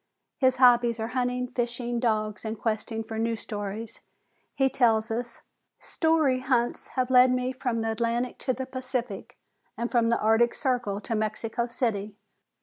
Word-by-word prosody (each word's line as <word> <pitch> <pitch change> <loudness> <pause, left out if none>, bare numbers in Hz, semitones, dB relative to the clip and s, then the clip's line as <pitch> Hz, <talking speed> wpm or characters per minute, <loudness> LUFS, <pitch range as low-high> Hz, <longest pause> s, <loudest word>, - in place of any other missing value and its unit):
His 260 -2 +4
hobbies 240 -2 +5
are 220 +1 -2
hunting, 250 0 -1
fishing, 240 -1 -2
dogs, 215 -3 -1
and 220 0 -4
questing 225 +1 -2
for 220 0 -5
new 230 0 0
stories. 210 +1 -6 0.5
He 270 -1 +3
tells 225 -4 +2
us: 235 +1 -4 0.3
"Story 315 -6 +1
hunts 250 -2 0
have 255 0 +1
led 255 0 +7
me 250 0 0
from 245 -3 -2
the 225 0 -1
Atlantic 235 +2 -1
to 260 - 0
the 260 +1 -4
Pacific 250 -4 -5 0.4
and 235 +2 -3
from 235 -2 +3
the 235 - +2
Arctic 225 +2 +3
Circle 240 -7 -1
to 230 - -4
Mexico 220 +2 -1
City. 215 -4 -2
235 Hz, 155 wpm, -27 LUFS, 225-250 Hz, 0.5 s, led